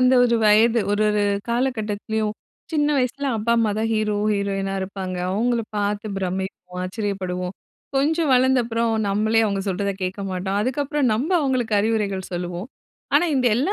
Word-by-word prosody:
அந்த 255 +1 +5
ஒரு 235 -1 +3
வயது 225 +2 +5
ஒரு 205 +1 +2
ஒரு 210 0 +1 0.3
காலகட்டத்திலயும், 220 -3 -1 0.4
சின்ன 295 -2 +2
வயசுல 265 +2 -1
அப்பா 225 +2 +1
அம்மாதான் 220 0 +1
ஹீரோ, 215 -1 0 0.2
ஹீரோயினா 195 -1 -1
இருப்பாங்க. 190 -1 -4
அவங்களப் 230 +2 0
பார்த்து 205 +1 -1
பிரமிப்போம், 185 -1 -4
ஆச்சரியப்படுவோம். 185 -2 -3 0.4
கொஞ்சம் 310 +2 +2
வளர்ந்தப்புறம், 240 -3 +2 0.2
நம்மளே 215 +3 +2
அவங்க 200 -2 -1
சொல்றதக் 195 +1 -2
கேட்கமாட்டோம்! 190 +1 -2
அதுக்கப்பறம், 275 +1 0
நம்ப 270 - -1
அவங்களுக்கு 255 -6 0
அறிவுரைகள் 205 -4 -1
சொல்லுவோம். 175 +4 -4 0.5
ஆனா 300 +4 +5
இந்த 255 -2 +2
எல்லா 280 - +1
215 Hz, 135 wpm, -22 LUFS, 195-245 Hz, 0.5 s, அந்த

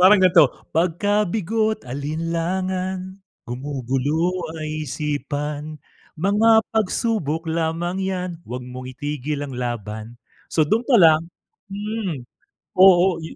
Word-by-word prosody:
Parang 190 +3 +8
gan'to, 175 -5 +7 0.2
'Pagka 195 +5 +1
bigo't 220 +3 0
alinlangan, 180 +7 -3 0.3
gumugulo 135 +6 -1 0.3
ay 155 -1 -4
isipan, 150 +2 -3 0.4
mga 215 +6 +4
pagsubok 205 -7 0
lamang 165 +3 -1
'yan, 185 -1 -2 0.2
huwag 125 +1 -5
mong 125 +1 -8
itigil 145 +1 -4
ang 140 - -7
laban 115 -2 -5 0.3
So, 155 - +2
dun 220 +10 0
pa 255 - +6
lang 165 -3 +5 0.4
hmm, 200 - -4 0.5
oo, 185 -1 +6
yun 160 - -8
165 Hz, 110 wpm, -22 LUFS, 145-190 Hz, 0.5 s, Parang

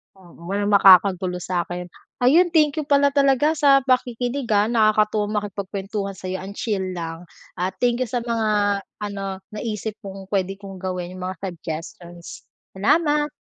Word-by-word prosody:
Oo 185 -2 -18 0.2
walang 205 +2 -1
makakagulo 185 -2 +5
sa'kin. 175 0 -3 0.3
Ayun 330 +8 +4
thank 305 -2 +3
you 300 - -3
pala 280 0 +4
talaga 275 +1 +3
sa 275 -2 +5
pakikinig 250 0 0
ah, 205 +2 +3
nakakatuwa 215 -2 +2
makipagkwentuhan 200 0 -5
sa'yo 185 0 -5
ang 195 +1 -8
chill 190 -5 -2
lang. 165 0 -6 0.3
Ah 185 +1 -2
thank 240 +4 0
you 255 - +1
sa 245 +1 -2
mga 215 -4 +1 0.2
ano, 195 -2 -5
naisip 215 0 -4
mong 195 -1 -9
pwede 195 -1 0
kong 195 -1 -9
gawin, 180 -1 -5
yung 185 - -5
mga 190 +1 -5
suggestions. 170 +1 -8 0.3
Salamat. 295 - +2
205 Hz, 145 wpm, -22 LUFS, 185-240 Hz, 0.3 s, makakagulo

